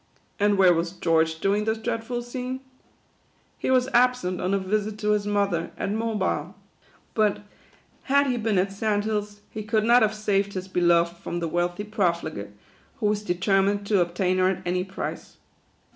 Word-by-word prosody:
And 205 0 +3
where 185 -2 +6
was 170 +1 -1
George, 160 -2 +1
during 205 +2 +1
this 220 0 0
dreadful 235 +1 -3
scene? 255 +2 -5 1.0
He - - -2
was 255 -1 +3
absent 250 -7 +2
on 185 - 0
a 200 - +3
visit 210 +2 -1
to 210 0 0
his 205 -1 +1
mother, 200 -5 0
at 200 - -2
Mobile. 220 -3 -1 0.6
But, 210 -2 +1 0.6
had 280 +1 +4
he 250 -3 0
been 220 -3 0
at 190 +2 +1
Sand 205 +1 -1
Hills, 210 -1 -3
he 215 - -5
could 215 0 0
not 240 +2 +5
have 215 0 +2
saved 200 -1 0
his 185 0 -5
beloved 170 -2 +2
from 175 0 -4
the 170 - -2
wealthy 175 +4 -1
profligate, 170 - -1 0.5
who 220 - -1
was 210 0 +1
determined 195 +1 +1
to 200 -2 +3
obtain 180 +2 0
her 185 0 +4
at 185 -1 -3
any 180 +1 0
price. 190 +1 -6
205 Hz, 175 wpm, -25 LUFS, 180-215 Hz, 1.0 s, where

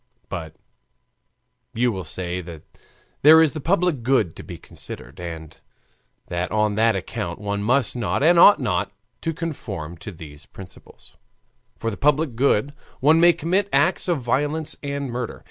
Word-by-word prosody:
But 80 -4 -6 1.2
you 120 +1 +2
will 95 -3 -5
say 90 +2 -4
that 85 -3 -10 0.6
there 155 +3 +8
is 160 -2 +4
the 155 - -5
public 175 -4 +1
good 120 -9 +1
to - - -9
be - - -9
considered, 70 +9 -9
and 80 -3 -7 0.7
that 85 +1 -3
on 105 -1 +1
that 110 +1 +2
account 85 -2 -4
one 100 0 -3
must 125 +4 +1
not 120 +3 -1
and 170 +2 +5
ought 205 +4 +8
not 90 -1 -1 0.3
to 165 - -1
conform 105 - -6
to 105 - -8
these 80 -4 -12
principles; 95 -2 -14 0.6
for 115 - -2
the 105 - -7
public 150 -2 +1
good 135 +1 +1 0.3
one 155 +4 +5
may 175 +1 +7
commit 185 +5 -1
acts 145 +9 +2
of 175 -4 +1
violence 145 +6 -1
and 140 -1 -3
murder. 120 -1 -4
120 Hz, 160 wpm, -22 LUFS, 90-150 Hz, 1.2 s, there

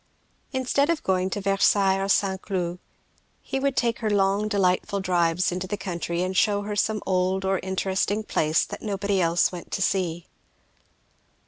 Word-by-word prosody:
Instead 265 +3 +1
of 335 -2 0
going 185 0 +1
to 205 - -3
Versailles 195 0 +3
or 195 - -1
St. 190 -1 +1
Cloud, 180 -3 -3 0.6
he 270 - -4
would 275 -1 -1
take 235 -1 +1
her 220 - -1
long 200 +1 +2
delightful 200 -1 +1
drives 175 -2 +1
into 180 +1 -3
the 205 +2 -3
country 170 -2 -3
and 185 +1 -3
shew 205 +1 +2
her 210 0 -4
some 215 +1 0
old 185 +1 0
or 190 -1 +1
interesting 190 +2 -1
place 155 -6 +1
that - - -8
nobody 200 -2 -1
else 170 0 +2
went 175 -2 -8
to 195 - -3
see. 175 -3 -1
195 Hz, 165 wpm, -25 LUFS, 180-205 Hz, 0.6 s, Versailles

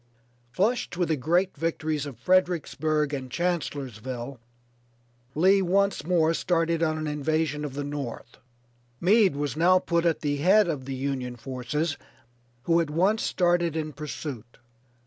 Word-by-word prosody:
Flushed 200 - 0
with 175 -2 0
the 160 - +2
great 175 +7 +1
victories 155 -1 -2
of 135 - -9
Fredericksburg 155 -5 +1
and 130 -2 -4
Chancellorsville, 130 - -3 1.0
Lee 190 +5 +4
once 195 -1 +1
more 165 -1 +2
started 165 -1 0
on 155 -1 +1
an 155 - -3
invasion 150 0 -1
of 140 -3 -5
the 145 - -3
North. 140 -4 -6 0.6
Meade 195 -2 +4
was 145 -2 -2
now 175 +4 +5
put 170 -2 0
at 165 - 0
the 145 -1 -1
head 190 +8 +4
of 145 -6 -3
the 135 0 -4
Union 130 -2 -3
forces, 135 +5 -3 0.7
who 170 0 +3
at 165 - -3
once 190 +8 +2
started 175 -2 +1
in 155 -1 -3
pursuit. 135 -6 -7
155 Hz, 145 wpm, -26 LUFS, 140-175 Hz, 1.0 s, now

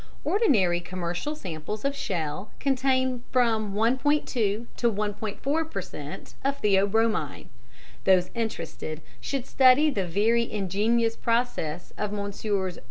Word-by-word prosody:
Ordinary 215 - +3
commercial 180 - -4
samples 185 - -5
of 280 0 +1
shell 185 - -3
contain 260 -2 +1
from 220 -5 +2
1.2 260 +7 +2
to 220 -1 -1 0.2
1.4 215 +9 -2
per - - -2
cent. - - -8
of 280 +1 0
theobromine. 200 -4 +1 0.6
Those 185 -2 +4
interested 220 -8 -4 0.2
should 260 - -3
study 270 +4 +5
the 195 -8 -1
very 225 +6 +2
ingenious 215 +4 +1
process 230 -9 -1
of 210 -1 -1
Messrs. 200 -2 -2
215 Hz, 110 wpm, -27 LUFS, 190-255 Hz, 0.6 s, study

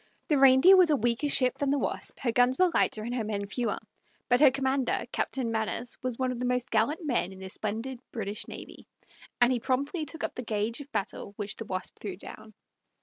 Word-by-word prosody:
The 295 -3 +3
Reindeer 270 +8 +8
was 365 -3 +6
a 300 - +4
weaker 240 +3 0
ship 255 -2 +2
than 285 - 0
the 285 - +2
Wasp, - - -4
her 245 - +1
guns 245 +2 +3
were 365 -1 +4
lighter, 215 - +1
and 240 +2 -4
her 245 -3 -1
men 205 -1 -3
fewer; 215 +1 -2 0.5
but 245 - +4
her 290 -1 +8
commander, 265 -2 0
Captain 255 -4 -1
Manners, 225 +2 -2
was 250 -2 -3
one 255 -1 0
of 245 - -5
the 250 - -2
most 250 0 -1
gallant 285 +10 +1
men 245 -9 0
in 190 - -11
the 190 0 -7
splendid 225 +6 -4
British 210 -2 -4
navy, - - -10 0.5
and 245 +1 +5
he 245 - 0
promptly 280 +7 -1
took 320 +3 -6
up - - -2
the - - -5
gage 220 +2 -2
of 285 0 -12
battle 200 -2 -4
which 205 -1 -3
the 225 - -7
Wasp 185 -2 -5
threw 195 -4 -6
down. 215 +2 -12
245 Hz, 220 wpm, -28 LUFS, 220-270 Hz, 0.5 s, Reindeer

